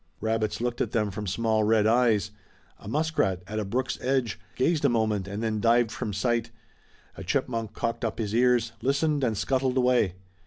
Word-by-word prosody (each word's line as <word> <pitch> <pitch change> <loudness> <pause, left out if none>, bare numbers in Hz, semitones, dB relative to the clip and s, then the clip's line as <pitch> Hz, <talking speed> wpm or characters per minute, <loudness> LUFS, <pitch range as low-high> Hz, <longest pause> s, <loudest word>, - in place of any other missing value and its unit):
Rabbits 110 -1 -1
looked 120 0 -2
at - - -2
them 105 -3 +1
from 105 +1 -5
small 110 +3 +1
red 110 0 +3
eyes. 110 -4 +3 0.5
A - - -12
muskrat, 140 - 0
at 110 +3 -4
a - - -1
brook's 125 +6 -2
edge, 130 -4 0 0.2
gazed 155 +4 +1
a - - +5
moment 110 -4 0
and 100 +3 -4
then 110 -1 -1
dived 115 0 +3
from 115 -4 -4
sight. 115 +3 0 0.7
A - - -7
chipmunk 115 +1 -2
cocked 115 +1 -3
up 110 -2 -2
his 105 -2 -3
ears, 120 -1 +3
listened 140 +3 +1
and 115 -4 0
scuttled 130 +1 0
away. 125 -8 +2
115 Hz, 185 wpm, -27 LUFS, 105-125 Hz, 0.7 s, a